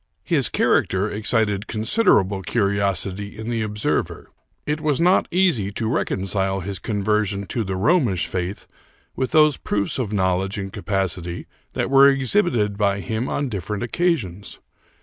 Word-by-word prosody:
His -, -, +2 dB
character 95 Hz, +3 st, +1 dB
excited 105 Hz, -1 st, 0 dB
considerable 110 Hz, -, +2 dB
curiosity 100 Hz, -1 st, -1 dB
in 110 Hz, +2 st, -5 dB
the 115 Hz, -2 st, -1 dB
ob 105 Hz, -1 st, -5 dB
server. 105 Hz, -, -2 dB, 0.3 s
It 150 Hz, +1 st, -2 dB
was 150 Hz, -3 st, +1 dB
not 180 Hz, +3 st, +3 dB
easy 170 Hz, -, +2 dB
to 110 Hz, +2 st, -2 dB
reconcile 95 Hz, -3 st, -1 dB
his 95 Hz, 0 st, -5 dB
conversion 105 Hz, -1 st, -1 dB
to 115 Hz, +5 st, -2 dB
the 95 Hz, -2 st, -3 dB
Romish 105 Hz, -, +2 dB
faith 90 Hz, +2 st, -4 dB, 0.5 s
with 130 Hz, -, -1 dB
those 155 Hz, -3 st, +4 dB
proofs 100 Hz, +5 st, -2 dB
of 115 Hz, -5 st, -2 dB
knowledge 95 Hz, 0 st, 0 dB
and 95 Hz, -1 st, -5 dB
capacity 95 Hz, -4 st, -3 dB, 0.3 s
that -, -, -2 dB
were 140 Hz, 0 st, +7 dB
exhibited 130 Hz, -, +1 dB
by 100 Hz, -1 st, +1 dB
him 110 Hz, +7 st, -3 dB
on 140 Hz, -, -1 dB
different 105 Hz, -1 st, -4 dB
occasions. 120 Hz, -, -2 dB
105 Hz, 145 wpm, -22 LUFS, 95-125 Hz, 0.5 s, were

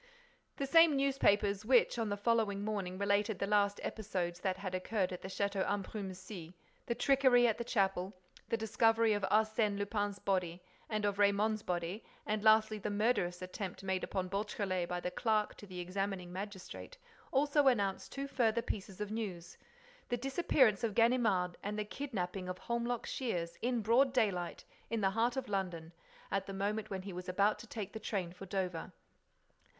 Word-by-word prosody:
The 275 Hz, -, -1 dB
same 330 Hz, +2 st, +6 dB
newspapers 210 Hz, -7 st, +2 dB
which, 240 Hz, 0 st, +4 dB
on 225 Hz, -2 st, 0 dB
the 205 Hz, -, -1 dB
following 205 Hz, -2 st, +1 dB
morning, 195 Hz, -4 st, -2 dB
related 200 Hz, +1 st, +1 dB
the -, -, -1 dB
last 205 Hz, 0 st, +2 dB
episodes 185 Hz, -5 st, -3 dB
that 185 Hz, -1 st, -1 dB
had 190 Hz, -1 st, -5 dB
occurred 185 Hz, 0 st, -1 dB
at 180 Hz, -, -6 dB
the -, -, -6 dB
Château 200 Hz, 0 st, -1 dB
d'Ambrumésy—the 190 Hz, 0 st, -5 dB
trickery 260 Hz, -1 st, +5 dB
at 225 Hz, -1 st, +2 dB
the -, -, -1 dB
chapel, 195 Hz, -4 st, 0 dB, 0.4 s
the 230 Hz, -, +1 dB
discovery 225 Hz, 0 st, +3 dB
of 205 Hz, -, -1 dB
Arsène 215 Hz, -1 st, +2 dB
Lupin's 205 Hz, 0 st, -1 dB
body 180 Hz, -3 st, -1 dB, 0.3 s
and 215 Hz, -1 st, -1 dB
of 205 Hz, 0 st, 0 dB
Raymonde's 205 Hz, +2 st, +3 dB
body 175 Hz, +3 st, -3 dB, 0.2 s
and, 210 Hz, 0 st, -1 dB
lastly, 215 Hz, 0 st, +5 dB
the 210 Hz, -, -3 dB
murderous 205 Hz, -4 st, +1 dB
attempt 185 Hz, +1 st, -6 dB
made 190 Hz, -1 st, -1 dB
upon 185 Hz, -1 st, -2 dB
Beautrelet 195 Hz, -2 st, -2 dB
by 180 Hz, 0 st, -1 dB
the 180 Hz, -, -3 dB
clerk 215 Hz, -1 st, +1 dB
to 205 Hz, -, -11 dB
the 185 Hz, -1 st, -7 dB
examining 185 Hz, 0 st, -3 dB
magistrate—also 280 Hz, -, -2 dB
announced 200 Hz, -7 st, +1 dB
two 275 Hz, 0 st, -4 dB
further 235 Hz, -4 st, +1 dB
pieces 195 Hz, -3 st, -5 dB
of 210 Hz, 0 st, -3 dB
news: 190 Hz, -7 st, -5 dB, 0.5 s
the 245 Hz, -, 0 dB
disappearance 260 Hz, -, +2 dB
of 220 Hz, -3 st, 0 dB
Ganimard, 220 Hz, -7 st, +3 dB
and 210 Hz, +1 st, -3 dB
the 210 Hz, -, -1 dB
kidnapping 195 Hz, -8 st, -4 dB
of 185 Hz, -, -4 dB
Holmlock 235 Hz, +1 st, -2 dB
Shears, 170 Hz, -10 st, -2 dB
in 240 Hz, 0 st, 0 dB
broad 250 Hz, +5 st, +4 dB
daylight, 190 Hz, -8 st, 0 dB, 0.2 s
in 230 Hz, -1 st, -1 dB
the 195 Hz, -1 st, +3 dB
heart 235 Hz, +4 st, +1 dB
of 260 Hz, -1 st, -2 dB
London, 180 Hz, -5 st, -3 dB, 0.4 s
at 195 Hz, -1 st, -1 dB
the 195 Hz, -, -5 dB
moment 205 Hz, +2 st, -2 dB
when 190 Hz, -2 st, -4 dB
he 195 Hz, -1 st, -6 dB
was 180 Hz, +1 st, -6 dB
about 200 Hz, +3 st, +2 dB
to 235 Hz, -, -10 dB
take 210 Hz, -3 st, -6 dB
the 220 Hz, -, -5 dB
train 190 Hz, -5 st, -3 dB
for 195 Hz, +1 st, -10 dB
Dover. 180 Hz, -3 st, -3 dB
205 Hz, 170 wpm, -34 LUFS, 190-225 Hz, 0.5 s, same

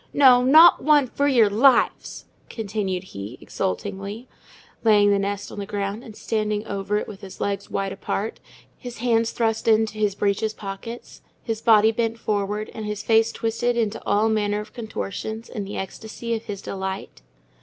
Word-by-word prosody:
no, 255 Hz, -3 st, +7 dB
not 315 Hz, +7 st, +7 dB
one, 295 Hz, -2 st, +5 dB
for 280 Hz, +3 st, -1 dB
your 240 Hz, -6 st, +5 dB
lives!" 240 Hz, +5 st, +2 dB, 0.2 s
continued 200 Hz, -4 st, -3 dB
he, 105 Hz, -, -8 dB
exultingly; 200 Hz, +4 st, -4 dB, 0.6 s
laying 205 Hz, -2 st, +5 dB
the 200 Hz, -, +3 dB
nest 200 Hz, 0 st, -3 dB
on -, -, -7 dB
the 200 Hz, -, -4 dB
ground, 205 Hz, +2 st, -3 dB
and 220 Hz, -4 st, -11 dB
standing 215 Hz, -1 st, -2 dB
over 200 Hz, 0 st, -2 dB
it -, -, -3 dB
with 205 Hz, -1 st, -10 dB
his 195 Hz, -2 st, -10 dB
legs 200 Hz, 0 st, -2 dB
wide 195 Hz, 0 st, -2 dB
apart, 210 Hz, +3 st, -4 dB, 0.4 s
his 245 Hz, -1 st, -8 dB
hands 230 Hz, -1 st, +1 dB
thrust 225 Hz, -1 st, -1 dB
into 220 Hz, -1 st, +2 dB
his 205 Hz, -2 st, +1 dB
breeches 205 Hz, +2 st, 0 dB
pockets, 210 Hz, +4 st, -8 dB, 0.2 s
his 225 Hz, -2 st, -3 dB
body 220 Hz, -1 st, +5 dB
bent 230 Hz, 0 st, -1 dB
forward, 210 Hz, -1 st, -2 dB
and 215 Hz, -1 st, -6 dB
his 210 Hz, -1 st, -4 dB
face 225 Hz, 0 st, +3 dB
twisted 235 Hz, +1 st, -1 dB
into 225 Hz, -1 st, -1 dB
all 210 Hz, +2 st, +2 dB
manner 210 Hz, -1 st, 0 dB
of 210 Hz, 0 st, -9 dB
contortions 220 Hz, -1 st, -5 dB
in 205 Hz, -3 st, -5 dB
the 200 Hz, -, -6 dB
ecstasy 220 Hz, +4 st, -5 dB
of 225 Hz, 0 st, -4 dB
his 200 Hz, -2 st, -6 dB
delight. 190 Hz, 0 st, -5 dB
215 Hz, 170 wpm, -23 LUFS, 200-230 Hz, 0.6 s, no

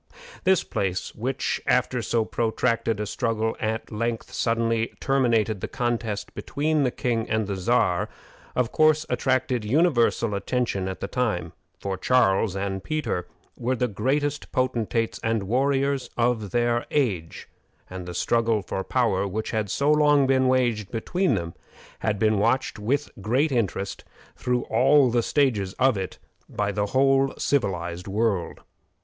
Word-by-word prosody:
This 190 Hz, -2 st, +4 dB
battle, 95 Hz, -2 st, -2 dB, 0.2 s
which, 130 Hz, +4 st, -2 dB
after 125 Hz, 0 st, +2 dB
so 115 Hz, -1 st, 0 dB
protracted 115 Hz, -1 st, 0 dB
a 105 Hz, -, -1 dB
struggle, 110 Hz, 0 st, -1 dB
at 110 Hz, +1 st, -3 dB
length 115 Hz, +2 st, -3 dB
suddenly 115 Hz, -1 st, 0 dB
terminated 115 Hz, -7 st, +1 dB
the -, -, -2 dB
contest 115 Hz, -4 st, -2 dB
between 150 Hz, +1 st, -1 dB
the 130 Hz, -, +3 dB
king 115 Hz, -2 st, -2 dB
and 110 Hz, 0 st, +1 dB
the 100 Hz, 0 st, -3 dB
Czar, 95 Hz, -2 st, +1 dB, 0.5 s
of 125 Hz, -2 st, +1 dB
course 155 Hz, 0 st, +3 dB
attracted 130 Hz, 0 st, +1 dB
universal 120 Hz, -4 st, +2 dB
attention 100 Hz, -1 st, -1 dB
at 95 Hz, -, -5 dB
the -, -, -2 dB
time, 105 Hz, -9 st, -1 dB, 0.3 s
for 95 Hz, -1 st, -3 dB
Charles 95 Hz, -3 st, +2 dB
and 95 Hz, -1 st, -3 dB
Peter 150 Hz, -, -2 dB, 0.3 s
were 125 Hz, +2 st, -1 dB
the 125 Hz, 0 st, 0 dB
greatest 145 Hz, +6 st, -1 dB
potentates 115 Hz, -3 st, 0 dB
and 110 Hz, -2 st, 0 dB
warriors 135 Hz, +4 st, +1 dB
of 120 Hz, -3 st, +1 dB
their 120 Hz, +2 st, +1 dB
age, 100 Hz, -, -1 dB, 0.4 s
and 90 Hz, -1 st, -7 dB
the 90 Hz, -, -6 dB
struggle 115 Hz, -1 st, +1 dB
for 95 Hz, +1 st, -3 dB
power 100 Hz, -6 st, +1 dB
which 110 Hz, +3 st, -3 dB
had 110 Hz, -2 st, -1 dB
so 140 Hz, +8 st, +2 dB
long 150 Hz, -2 st, +4 dB
been 130 Hz, -1 st, +3 dB
waged 120 Hz, -6 st, +1 dB
between 175 Hz, -, 0 dB
them 85 Hz, -3 st, -4 dB, 0.5 s
had 105 Hz, -2 st, 0 dB
been 110 Hz, 0 st, +2 dB
watched 115 Hz, +2 st, +1 dB
with 140 Hz, +8 st, -1 dB
great 130 Hz, +9 st, +1 dB
interest, 100 Hz, -5 st, -2 dB, 0.3 s
through 125 Hz, -1 st, -1 dB
all 135 Hz, +2 st, +4 dB
the 120 Hz, 0 st, +2 dB
stages 115 Hz, -9 st, +1 dB
of 130 Hz, -1 st, +3 dB
it, 95 Hz, -2 st, -4 dB, 0.3 s
by 105 Hz, 0 st, -1 dB
the 105 Hz, 0 st, -1 dB
whole 135 Hz, +3 st, +3 dB
civilized 90 Hz, -9 st, -1 dB
world. 100 Hz, -2 st, -1 dB
115 Hz, 145 wpm, -25 LUFS, 105-130 Hz, 0.5 s, This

